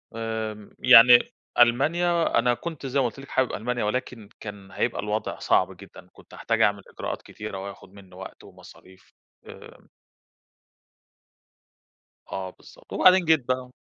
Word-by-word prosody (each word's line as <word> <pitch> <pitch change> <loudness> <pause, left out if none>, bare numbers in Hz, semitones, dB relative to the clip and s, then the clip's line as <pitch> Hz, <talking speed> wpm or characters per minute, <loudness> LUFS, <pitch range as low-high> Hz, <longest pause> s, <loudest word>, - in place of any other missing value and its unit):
آمم 110 -2 -5
يعني، 125 0 +7 0.3
ألمانيا 160 +8 +2
أنا 120 +1 +2
كنت 155 +1 -7
زي 135 +1 -1
ما 135 - +2
قُلت 120 +3 -5
لِك 135 - -12
حابب 130 -1 0
ألمانيا 120 +2 -3
ولكن 110 -1 -4
كان 100 -2 -10
هيبقى 120 - -2
الوضع 105 +1 -4
صعب - - +1
جدًا، - - -15
كنت - - -19
هاحتاج - - -2
أعمل - - +2
إجراءات - - -6
كتيرة 105 -2 -8
وهياخد 100 -1 -11
مني 95 -2 -16
وقت 95 +1 -11
ومصاريف، 95 0 -18 0.3
آآ - - -14 2.4
آه 95 -1 -4
بالضبط، - - -18
وبعدين 185 0 +5
جيت 160 -5 +2
بقى 130 0 -2
120 Hz, 140 wpm, -25 LUFS, 105-130 Hz, 2.4 s, يعني